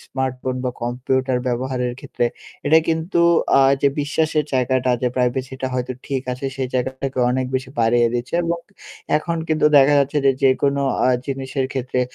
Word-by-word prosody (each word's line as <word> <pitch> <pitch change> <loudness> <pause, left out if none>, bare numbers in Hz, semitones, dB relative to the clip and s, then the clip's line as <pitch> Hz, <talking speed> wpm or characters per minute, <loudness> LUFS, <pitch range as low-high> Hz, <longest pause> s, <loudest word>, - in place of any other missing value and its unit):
smartphone 130 -1 -3
বা 125 - 0
computer 130 +1 0
ব্যবহারের 125 0 -1
ক্ষেত্রে 135 -3 -3 0.4
এটা 160 +2 +6
কিন্তু 165 +3 0 0.4
আ - - +6 0.2
যে 140 - +5
বিশ্বাসের 155 +1 0
জায়গাটা 130 0 +1
যে 125 - +2
প্রাইভেসিটা 130 +1 -1
হয়তো 125 0 -2
ঠিক 135 -2 -2
আছে 125 +2 -7
সেই 130 -1 -2
জায়গাটাকে 130 +1 -2
অনেক 130 0 0
বেশি 130 0 -2
বাড়িয়ে 120 +1 +3
দিচ্ছে 120 +5 -3
এবং 170 0 -1 0.6
এখন 170 +2 -2
কিন্তু 155 -1 +3
দেখা 140 +1 +6
যাচ্ছে 140 +2 +1
যে, - - +7
যে 135 - +6
কোনো 140 0 +2 0.3
আ - - +4 0.2
জিনিসের 135 0 -2
ক্ষেত্রে 130 -1 -2
130 Hz, 165 wpm, -21 LUFS, 125-140 Hz, 0.6 s, যে